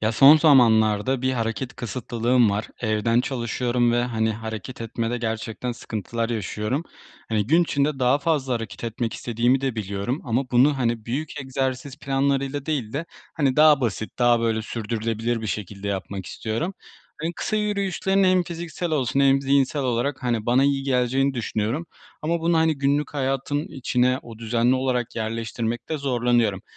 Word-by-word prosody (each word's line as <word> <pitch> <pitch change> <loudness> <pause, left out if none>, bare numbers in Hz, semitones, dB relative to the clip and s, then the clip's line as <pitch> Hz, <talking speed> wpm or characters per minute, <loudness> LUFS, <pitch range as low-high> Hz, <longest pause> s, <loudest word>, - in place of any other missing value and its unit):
Ya, 110 +1 +1
son 140 +6 +8
zamanlarda 120 -4 +4
bir 130 0 +1
hareket 120 +2 -3
kısıtlılığım 120 -1 +1
var. 105 +3 -2
Evden 110 +1 +1
çalışıyorum 120 -1 0
ve, 120 0 +2
hani, 110 -2 0
hareket 110 +2 -7
etmede 115 +1 -2
gerçekten 115 +1 -3
sıkıntılar 115 0 -4
yaşıyorum. 110 +5 -2 0.4
Hani, 105 -2 0
gün 165 +7 +4
içinde 145 -3 0
daha 130 +2 +3
fazla 140 -5 0
hareket 115 -1 -5
etmek 115 0 -3
istediğimi 120 +3 +1
de 135 -3 -1
biliyorum 100 +5 -3
ama 125 +1 -1
bunu, 135 +4 +4
hani, 115 -3 -1
büyük 145 +5 -3
egzersiz 130 +1 -3
planlarıyla 140 0 -1
değil 135 -9 -2
de, 150 +4 -2 0.3
hani, 140 -5 +1
daha 150 -2 +6
basit, 115 -2 -3
daha, 120 -1 +4
böyle, 110 -1 0
sürdürülebilir 115 +1 -2
bir 110 - -4
şekilde 100 0 -4
yapmak 95 -1 -4
istiyorum. 115 - -3 0.5
Hani, 165 - -1
kısa 215 - -2
yürüyüşlerin 195 -2 +1
hem 185 -1 +4
fiziksel 170 0 -5
olsun 135 -3 +1
hem 135 0 +4
zihinsel 140 +1 +2
olarak, 130 +2 -1
hani, 120 -3 -1
bana 125 +3 +4
iyi 140 -1 +1
geleceğini 135 +1 +1
düşünüyorum 115 +6 -2 0.4
ama 170 +2 0
bunu, 165 0 +2
hani, 160 -2 +2
günlük 140 +2 0
hayatın 135 +2 -1
içine, 125 -1 +1
o, 115 -2 -11
düzenli 115 +2 +2
olarak 130 -2 -1
yerleştirmekte 115 +5 -3
zorlanıyorum. 120 -7 +1
125 Hz, 155 wpm, -24 LUFS, 115-140 Hz, 0.5 s, son